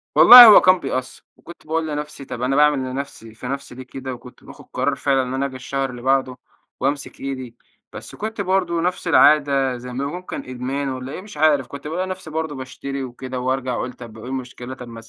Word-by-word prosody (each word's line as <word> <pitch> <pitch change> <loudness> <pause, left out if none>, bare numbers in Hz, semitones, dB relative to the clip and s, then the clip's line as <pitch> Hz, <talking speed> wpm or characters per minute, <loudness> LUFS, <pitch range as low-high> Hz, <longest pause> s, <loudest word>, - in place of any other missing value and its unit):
والله 245 0 +11
هو 215 -3 +9
كان 185 0 +4
بيأثّر. 130 -3 -5
وكنت 170 -1 -15
باقول 160 0 -1
لنفسي 150 -2 -6
طب 125 - -7
أنا 130 +2 0
باعمل 150 -1 +4
لنفسي 130 -4 -7
في 115 +3 -9
نفسي 135 -1 -6
ليه 130 - -9
كده؟ 130 +1 -7
وكنت 125 0 -14
باخد - - -14
قرار - - 0
فعلًا 135 -1 +1
إن 125 0 -5
أنا 135 +1 -1
أجي 135 -1 -6
الشهر 135 +1 -3
اللي 125 -1 -9
بعده، 130 -1 0 0.4
وامسك 140 +2 -3
إيدي. 130 -3 -6 0.4
بس - - -10
كنت 220 0 -5
برضه 185 -3 0
نفس 180 0 -2
العادة 140 -5 +4
زي 125 +1 -9
ما 135 +3 -3
ممكن 180 +5 -6
إدمان 130 +2 -4
والّا 130 0 -6
إيه 185 - -7
مش 205 -3 -13
عارف. 145 -4 +2
كنت 140 +1 -9
بالاقى 180 +4 -3
نفسي 185 -3 -7
برضه 160 -1 -4
باشتري 135 +1 -6
وكده، 130 0 -7
وارجع 130 0 -2
أقول 125 +1 -4
طب 115 -3 -12
وإيه 110 +3 -9
المشكلة؟ 130 -1 -6
طب 125 -2 -10
ما 115 -1 -10
135 Hz, 210 wpm, -21 LUFS, 130-155 Hz, 0.4 s, والله